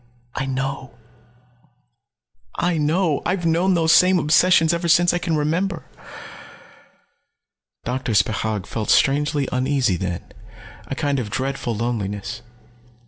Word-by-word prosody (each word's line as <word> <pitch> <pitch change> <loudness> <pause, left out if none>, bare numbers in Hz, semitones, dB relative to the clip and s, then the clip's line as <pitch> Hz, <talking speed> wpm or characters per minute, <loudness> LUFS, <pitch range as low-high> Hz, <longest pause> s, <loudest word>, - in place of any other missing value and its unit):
"I 135 - -3
know. 135 -1 -4 1.6
I 170 -2 0
know. 155 +1 +1
I've 180 -1 -2
known 175 +3 +2
those 165 -1 +2
same 185 +1 +5
obsessions 165 +1 +4
ever 170 0 -2
since 175 +1 +4
I 175 - 0
can 165 -2 -1
remember." 165 +4 -1 2.0
Doctor 125 -1 -2
Spechaug 105 0 0
felt 110 0 -5
strangely 145 0 +2
uneasy 130 -6 0
then, 90 -1 -4 0.6
a 135 - -4
kind 140 -1 -1
of 110 -4 -4
dreadful 130 0 -3
loneliness. 105 -3 -4
145 Hz, 115 wpm, -21 LUFS, 120-170 Hz, 2.0 s, same